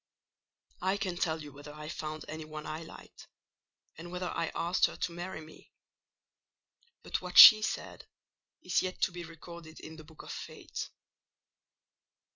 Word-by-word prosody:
"I 190 +2 +1
can 190 -3 -3
tell 160 -2 -1
you 145 - -10
whether 145 +1 -11
I 150 0 -8
found 155 -1 -6
any 155 0 -6
one 155 0 -8
I 155 +1 -5
liked, 160 - -13 0.7
and 175 +1 -9
whether 180 0 -3
I 165 - -1
asked 175 +2 +2
her - - -9
to 180 - -2
marry 175 0 -6
me: 155 0 -16 1.3
but - - -3
what - - -5
she 215 -2 +12
said 215 +1 -4 0.6
is - - +1
yet 185 0 -4
to - - +2
be 175 0 -7
recorded 165 0 -11
in 160 0 -10
the 155 - -11
book 155 0 -14
of - - -8
Fate. - - -7
165 Hz, 160 wpm, -31 LUFS, 155-180 Hz, 1.3 s, she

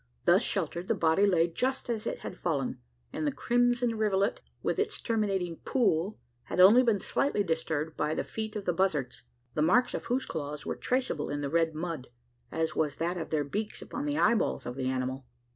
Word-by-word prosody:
Thus - - +6
sheltered, 175 +2 -2
the - - +2
body 165 +5 +3
lay 170 -3 +4
just 260 +10 -2
as 225 -3 -2
it - - -3
had - - -6
fallen; - - -2 0.3
and 155 - -1
the - - +2
crimson 245 - +1
rivulet, 200 -1 +1 0.2
with - - 0
its - - -1
terminating 195 -7 -1
"pool," 205 -6 +1 0.3
had - - -4
only 205 +7 +9
been 230 -5 +3
slightly 240 0 0
disturbed 160 -2 -2
by 150 +1 0
the - - -1
feet 220 -1 -5
of 205 -2 -4
the 175 - +1
buzzards 150 -9 0 0.3
the 150 - 0
marks 235 +11 +4
of - - -4
whose 255 +2 0
claws 150 -1 -5
were - - -2
traceable 250 - -1
in 145 0 -2
the 140 -1 -3
red 165 -1 +2
mud, 160 -5 -4 0.4
as 160 0 -1
was 150 -2 0
that 170 +2 -1
of 165 -3 -4
their 155 -2 +1
beaks 210 +10 -4
upon 285 - -5
the 295 0 -1
eyeballs 230 - +2
of 125 - -5
the 130 -1 -2
animal. 130 0 -3
175 Hz, 200 wpm, -30 LUFS, 155-220 Hz, 0.4 s, only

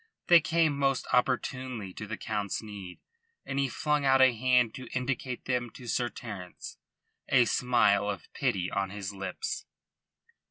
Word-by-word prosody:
They 175 -1 +9
came 160 -1 +2
most 135 -2 +1
opportunely 125 -4 0
to 105 - -7
the 110 - -4
Count's 105 -1 -3
need, 100 -4 -8 0.5
and 135 - -2
he 135 -1 +1
flung 150 +3 0
out 135 -1 +5
a 130 -1 +6
hand 125 -1 +3
to 130 -2 -8
indicate 125 0 -3
them 125 -2 -1
to 125 - -10
Sir 120 +1 0
Terence, 100 -9 -8 0.5
a 125 -2 +5
smile 105 -6 +3
of 100 - -5
pity 100 -10 -1
on 100 -1 -1
his 100 0 -5
lips. 430 - -4
125 Hz, 155 wpm, -29 LUFS, 105-135 Hz, 0.5 s, They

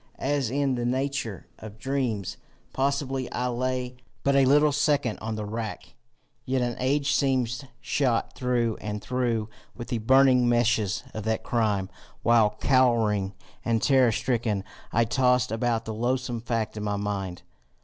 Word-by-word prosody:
As 140 0 0
is - - -2
in 140 +1 +1
the 120 -1 -2
nature 130 - -2
of 110 -1 -10
dreams, 125 -6 -2 0.4
possibly 135 -1 -1
I 125 0 -1
lay 125 0 -2 0.3
but 140 0 +2
a 135 -1 +5
little 145 +3 +5
second 145 -4 +1
on 110 0 -4
the 105 -1 -4
rack, 110 +1 -5 0.5
yet 130 -1 0
an 120 -1 -1
age 140 +2 +1
seemed 130 -2 0
shot 125 -5 0
through 120 -3 0
and 105 0 -4
through 115 -1 -1 0.3
with 120 - -8
the 120 - -1
burning 130 +1 +5
meshes 120 -4 +1
of 110 - -5
that 110 0 -1
crime, 105 -5 0 0.4
while, 110 -2 +4
cowering 115 -7 +2 0.3
and 115 -1 +1
terror 130 -2 +4
stricken, 110 -4 -1 0.3
I 115 - +3
tossed 125 0 +2
about 115 0 0
the 110 - -4
loathsome 120 +1 -1
fact 115 -2 -2
in 105 - -4
my 105 -1 -1
mind. 100 -3 -4
120 Hz, 155 wpm, -26 LUFS, 110-130 Hz, 0.5 s, a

